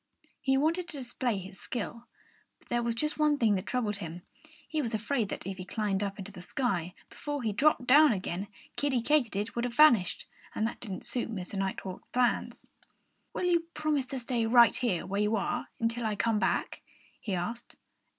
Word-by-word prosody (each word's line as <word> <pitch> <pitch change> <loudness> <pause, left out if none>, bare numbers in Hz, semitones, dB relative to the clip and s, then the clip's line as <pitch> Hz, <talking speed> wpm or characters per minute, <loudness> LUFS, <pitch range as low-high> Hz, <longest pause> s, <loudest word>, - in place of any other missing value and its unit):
He 270 0 +2
wanted 330 +5 +1
to 310 - -6
display 245 -3 -2
his 190 +1 -9
skill. 235 0 -5 0.5
But - - -28
there 240 -1 +1
was 235 -1 -1
just 300 +5 0
one 300 -1 +4
thing 225 -5 +3
that 185 -2 -2
troubled 220 -5 -1
him. 175 -2 -7 0.4
He 310 -1 -1
was 230 -4 -2
afraid 225 0 -1
that - - -5
if 195 0 -4
he 185 - -5
climbed 200 0 -1
up 200 -1 -2
into 200 0 -7
the 185 -3 -10
sky, 180 -4 -2
before 290 -3 -5
he 215 -2 0
dropped 275 +3 +3
down 295 +3 +7
again 190 -1 -3 0.3
Kiddie 265 -5 0
Katydid 225 -8 +1
would 235 - -1
have 245 -1 -3
vanished. 240 -12 +5 0.3
And 220 - +1
that 230 - -3
didn't 195 -6 -6
suit 245 -2 -1
Mr. 190 -5 -5
Nighthawk's 190 -1 -4
plans. 250 -1 0 0.7
"Will - - -1
you 340 -2 +2
promise 300 -4 0
to 270 - -4
stay 240 -2 0
right 235 0 +7 0.3
where 200 +2 0
you 210 +1 +2
are 200 - -1
until 235 +1 0
I 215 - -1
come 220 +1 +1
back?" - - 0 0.4
he 200 -4 -2
asked. 230 +7 -4
230 Hz, 190 wpm, -30 LUFS, 200-265 Hz, 0.7 s, down